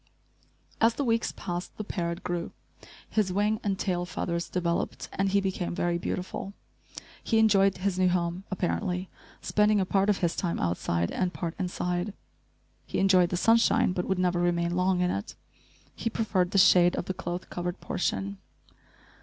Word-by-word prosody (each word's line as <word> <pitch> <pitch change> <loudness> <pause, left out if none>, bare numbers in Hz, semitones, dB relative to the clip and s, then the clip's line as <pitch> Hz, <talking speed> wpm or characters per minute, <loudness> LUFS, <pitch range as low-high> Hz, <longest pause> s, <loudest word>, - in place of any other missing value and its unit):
As 225 +1 +4
the 285 - -1
weeks 230 -2 +1
passed, 175 0 -5
the 215 - -3
parrot 170 -3 -3
grew, 175 -1 -3 0.5
his 210 -4 0
wing 210 +3 +1
and 195 -2 0
tail 180 -3 -1
feathers 170 -1 -3
developed, 170 -2 -2
and 195 0 +1
he 200 +1 +3
became 190 -3 -2
very 175 0 0
beautiful. 185 +3 -4 0.7
He 225 - +1
enjoyed 195 -3 +4
his 185 0 -1
new 185 -1 +4
home, 175 +1 -1
apparently, 185 0 -2 0.3
spending 210 0 +3
a 190 - +1
part 195 +2 +2
of 205 - +3
his 170 -2 0
time 170 -2 -1
outside, 85 0 0
and 185 -1 0
part 170 -2 -3
inside. 180 +1 -2 0.7
He - - -3
enjoyed 185 -2 +4
the 180 - -1
sunshine, 225 0 +4
but 180 -1 -2
would 190 - 0
never 180 -1 +1
remain 175 0 +1
long 180 0 +2
in 180 - +2
it. 100 - -4 0.6
He 230 - -2
preferred 210 -6 0
the 195 - 0
shade 180 -2 +6
of - - -3
the 185 - -2
cloth 175 0 -5
covered 175 +1 -3
portion. 100 - -2
180 Hz, 170 wpm, -28 LUFS, 175-195 Hz, 0.7 s, shade